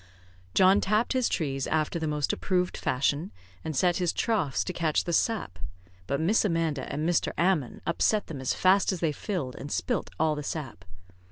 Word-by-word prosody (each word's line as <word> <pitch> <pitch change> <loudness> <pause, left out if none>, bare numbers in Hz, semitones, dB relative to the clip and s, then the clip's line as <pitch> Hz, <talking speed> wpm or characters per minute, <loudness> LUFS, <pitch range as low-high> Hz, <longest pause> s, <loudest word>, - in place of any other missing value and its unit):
John 190 +2 +6
tapped 215 +6 +1
his 255 -2 +1
trees 135 -4 -1
after 160 +2 0
the 160 - -2
most 150 -2 0
approved 180 -1 0
fashion, 145 +6 0 0.3
and 160 -2 -4
set 175 +5 +2
his 180 -3 +1
troughts 195 - 0
to 180 - -4
catch 160 -3 +1
the 170 - -3
sap; 165 - 0 0.5
but 140 - -1
Miss 185 +8 +3
Amanda 165 -7 -1
and 150 +2 -2
Master 175 0 +1
Ammon 170 -7 +1
upset 205 +5 +1
them 145 -5 -7
as 130 - 0
fast 190 +2 +4
as 185 - -3
they 160 -2 +1
filled, 150 - -4
and 145 - -7
spilt - - -1
all 160 0 +3
the 150 - -4
sap. 135 - -6
165 Hz, 185 wpm, -28 LUFS, 145-185 Hz, 0.5 s, John